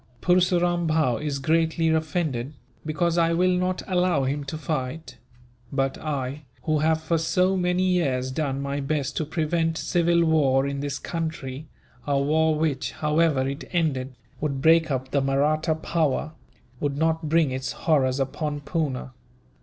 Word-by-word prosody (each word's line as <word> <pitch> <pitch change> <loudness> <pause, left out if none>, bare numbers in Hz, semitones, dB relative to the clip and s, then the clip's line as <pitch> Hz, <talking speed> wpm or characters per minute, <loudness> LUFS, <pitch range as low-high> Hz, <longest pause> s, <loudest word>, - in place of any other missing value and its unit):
"Purseram 175 +1 +2
Bhow 155 -7 +2
is 150 -2 -2
greatly 160 +3 +1
offended, 155 -4 -1 0.3
because 170 +2 0
I 165 0 +3
will 180 +2 +3
not 180 0 -1
allow 180 -6 +2
him 140 +2 -1
to 150 +3 -5
fight; 155 0 -4 0.5
but 135 -1 0
I, 140 -2 -3 0.2
who 155 -1 +1
have 160 +1 +2
for 165 +1 +1
so 180 +4 +2
many 180 0 +1
years 140 -9 +1
done 140 -1 -2
my 140 +1 -2
best 140 -1 -2
to 155 - 0
prevent 160 +1 0
civil 170 -1 +2
war 140 -4 +3
in 140 0 -3
this 140 -1 -3
country 155 -4 -5 0.4
a 140 -1 +2
war 155 +3 +2
which, 150 -3 -1
however 150 -3 +1
it 140 +3 -5
ended, 135 -6 0 0.2
would 140 -3 -2
break 160 +2 +4
up 130 -1 -2
the 140 - +2
Mahratta 150 +4 +1
power 155 -2 -1 0.5
would 140 -1 -2
not 160 0 0
bring 160 -3 +3
its 130 +1 -3
horrors 135 -5 +1
upon 145 +2 -2
Poona. 140 -4 -2
155 Hz, 155 wpm, -25 LUFS, 140-165 Hz, 0.5 s, break